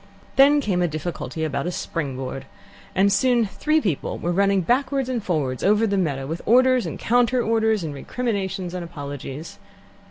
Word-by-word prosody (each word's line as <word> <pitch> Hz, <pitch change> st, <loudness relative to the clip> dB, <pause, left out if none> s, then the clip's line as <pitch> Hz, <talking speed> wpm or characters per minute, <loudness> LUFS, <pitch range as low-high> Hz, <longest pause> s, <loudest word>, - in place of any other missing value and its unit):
Then 285 Hz, +2 st, +6 dB
came 190 Hz, -8 st, 0 dB
a 175 Hz, -, +2 dB
difficulty 155 Hz, -1 st, -4 dB
about 155 Hz, +2 st, -2 dB
a -, -, -1 dB
spring 150 Hz, -6 st, -3 dB
board, 135 Hz, 0 st, -5 dB, 0.5 s
and 195 Hz, +1 st, +4 dB
soon 240 Hz, +2 st, +3 dB
three 305 Hz, +10 st, +1 dB
people 185 Hz, -, -2 dB
were 175 Hz, -, -2 dB
running 195 Hz, +1 st, +2 dB
backwards 260 Hz, -, 0 dB
and 240 Hz, -4 st, -2 dB
forwards 145 Hz, -9 st, -1 dB
over 210 Hz, +3 st, +4 dB
the 200 Hz, -2 st, 0 dB
meadow, 145 Hz, -8 st, -1 dB
with 160 Hz, +5 st, -4 dB
orders 255 Hz, +1 st, +4 dB
and -, -, -5 dB
counter 245 Hz, +1 st, +2 dB
orders 220 Hz, -3 st, +1 dB
and 155 Hz, -3 st, -4 dB
recriminations 195 Hz, -, -3 dB
and 180 Hz, -1 st, -4 dB
apologies. 145 Hz, -2 st, -7 dB
190 Hz, 170 wpm, -23 LUFS, 160-235 Hz, 0.5 s, Then